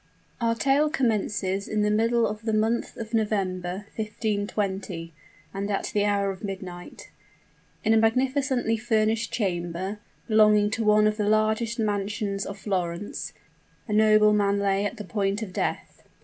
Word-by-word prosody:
Our 230 0 +2
tale 275 +5 +2
commences 210 -8 0
in 215 -1 0
the 210 - +2
middle 230 +2 +2
of 210 0 -3
the 220 -1 -2
month 220 +2 0
of 225 0 -7
November, 195 -3 -1
1520, 205 -5 -3 0.4
and 200 +1 -3
at 200 - -2
the 205 -1 +2
hour 200 -1 +1
of 190 - -10
midnight. 185 -3 -7 0.7
In 220 - +3
a - - +5
magnificently 255 +1 +1
furnished 220 0 0
chamber, 190 -2 -2 0.3
belonging 210 -2 +4
to 225 +1 -1
one 210 0 +5
of 215 0 +1
the 210 -1 +1
largest 220 +2 +1
mansions 205 -2 -2
of 200 - -6
Florence, 185 -1 -3 0.5
a 210 - -2
nobleman 210 -1 +4
lay 200 0 +1
at 205 - -3
the 210 - -6
point 200 +2 -1
of 190 -4 -8
death. - - -3
210 Hz, 150 wpm, -26 LUFS, 195-220 Hz, 0.7 s, a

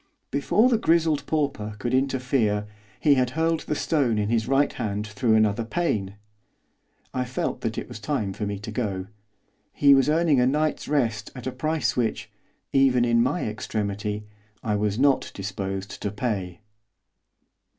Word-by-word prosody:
Before 175 - +3
the 235 -3 +2
grizzled 160 -5 +2
pauper 140 -9 -1
could 120 +4 -3
interfere, 125 -5 +1 0.3
he 145 - +5
had 130 -2 +2
hurled 165 0 +2
the 150 - -3
stone 140 -8 +1
in 105 0 0
his 115 -1 +1
right 135 +1 +2
hand 105 -1 -3
through 110 +2 +1
another 110 +1 +2
pane. 110 - -1 1.0
I 130 - 0
felt 125 0 -3
that - - -3
it - - -4
was - - -8
time 105 -3 -2
for 105 +1 -3
me 100 0 -3
to 105 +3 -7
go. 100 -5 -2 0.7
He 140 -1 +5
was 135 +1 +4
earning 155 -3 +3
a 125 - +4
night's 150 +2 0
rest 115 -7 0
at 125 - -8
a 130 - -1
price 140 -1 -1
which, 120 -3 -1 0.4
even 130 -3 +4
in 115 -1 +3
my 135 +8 0
extremity, 105 -1 -3 0.4
I 105 -2 0
was 105 0 0
not 135 +1 +3
disposed 95 0 -5
to 105 - -1
pay. 100 -4 -3
120 Hz, 160 wpm, -25 LUFS, 105-140 Hz, 1.0 s, he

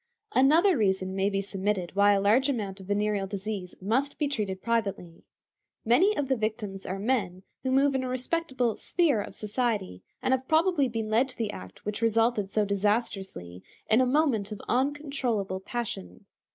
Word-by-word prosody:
Another 325 +9 +5
reason 190 -4 0
may 195 +1 +1
be 195 -1 -1
submitted 195 -2 -2
why 205 +1 +5
a 200 - +2
large 225 +8 +3
amount 205 -7 -3
of 190 - -11
venereal 205 -1 0
disease 195 -2 -5
must 255 +9 0
be 295 - 0
treated 210 -9 -2
privately. 200 -7 -2 0.6
Many 360 - +4
of 285 - 0
the 265 - +2
victims 215 -3 -3
are 190 - -3
men 195 -4 -1 0.2
who 260 - -2
move 275 +2 +3
in 265 -1 0
a - - -3
respectable 255 -3 0
sphere 305 - +1
of - - -8
society, 210 - -2 0.2
and 260 - +1
have 260 0 -1
probably 320 -3 +3
been 225 -2 -3
led 245 +5 +3
to - - -9
the 220 -3 -2
act 95 - -11
which 210 +1 -3
resulted 225 -2 +2
so 210 +1 +1
disastrously 195 - -2 0.3
in 225 +4 +6
a 255 - +3
moment 255 -7 +1
of 210 - -6
uncontrollable 260 -7 -1
passion. 190 - -6
215 Hz, 175 wpm, -28 LUFS, 195-260 Hz, 0.6 s, in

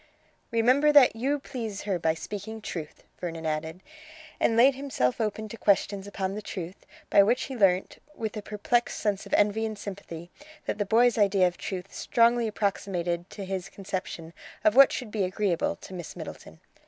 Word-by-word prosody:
"Remember 255 +6 +4
that 285 -6 +7
you 270 +6 0
please 230 -7 -6
her 195 -4 -1
by 160 -1 +1
speaking 210 +5 -6
truth," 165 -7 -7 0.2
Vernon 165 -2 -5
added, 160 +3 -3 0.6
and 225 - +2
laid 260 +4 +7
himself 260 - -1
open 215 0 -2
to 230 - -8
questions 200 -1 +1
upon 195 -1 -3
the 210 - -5
truth, 185 -3 -7 0.2
by 200 - +8
which 235 +6 +2
he 265 - -6
learnt, 190 -4 +2 0.2
with 220 -1 -4
a 210 - -4
perplexed 225 +4 0
sense 205 -2 -1
of - - -9
envy 210 +2 +2
and 220 -1 -3
sympathy, 180 -4 -8 0.3
that - - -3
the 205 - +1
boy's 230 +3 +4
idea 200 -2 +4
of 180 -1 0
truth 190 0 -6
strongly 235 -2 +3
approximated 180 -4 -2
to 200 - -7
his 190 0 -4
conception 185 -4 -6 0.3
of 215 - +4
what 275 0 +8
should 245 -5 -5
be 210 -2 0
agreeable 185 -2 0
to - - -12
Miss 175 -3 -7
Middleton. 80 0 -9
205 Hz, 180 wpm, -27 LUFS, 185-225 Hz, 0.6 s, by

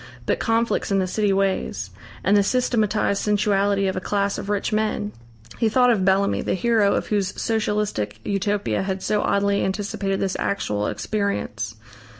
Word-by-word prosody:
But - - 0
conflicts 230 0 +1
in 195 - +3
the 190 - +2
city 205 +2 0
ways! 190 - -1 0.3
And 200 +3 +3
the 205 - +6
systematised 215 -3 +1
sensuality 205 -1 +2
of 190 - 0
a - - -1
class 200 +1 -1
of 200 - -6
rich 205 0 -1
men! 215 -1 0 0.5
He 225 - +3
thought 250 +2 +4
of 210 -5 +1
Bellamy, 195 +1 +2
the - - -1
hero 215 0 +2
of - - -1
whose 200 -3 -1
Socialistic 210 - -1
Utopia 205 +1 0
had 190 0 -3
so 210 - +1
oddly 200 0 +1
anticipated 195 0 -2
this 190 -1 -1
actual 105 - -1
experience. 110 - -2
200 Hz, 160 wpm, -23 LUFS, 190-210 Hz, 0.5 s, the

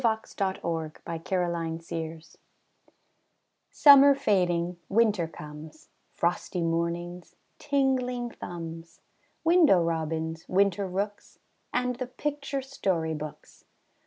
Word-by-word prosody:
PICTURE 220 -4 0
BOOKS 165 0 -5
IN 170 -3 -1
WINTER 160 0 -4 1.5
Summer 280 -1 +8
fading, 180 -9 +1
winter 210 -5 +3
comes 150 0 -11 0.3
Frosty 175 +1 -1
mornings, 170 +1 -2 0.2
tingling 255 -4 0
thumbs, 165 -3 -8 0.4
Window 325 - +6
robins, 160 0 -2
winter 195 0 +2
rooks, 200 +3 -4 0.3
And 250 -1 0
the 255 -1 -4
picture 280 +1 -3
story 185 -12 -1
books. 150 -1 -9
180 Hz, 90 wpm, -28 LUFS, 165-245 Hz, 1.5 s, Summer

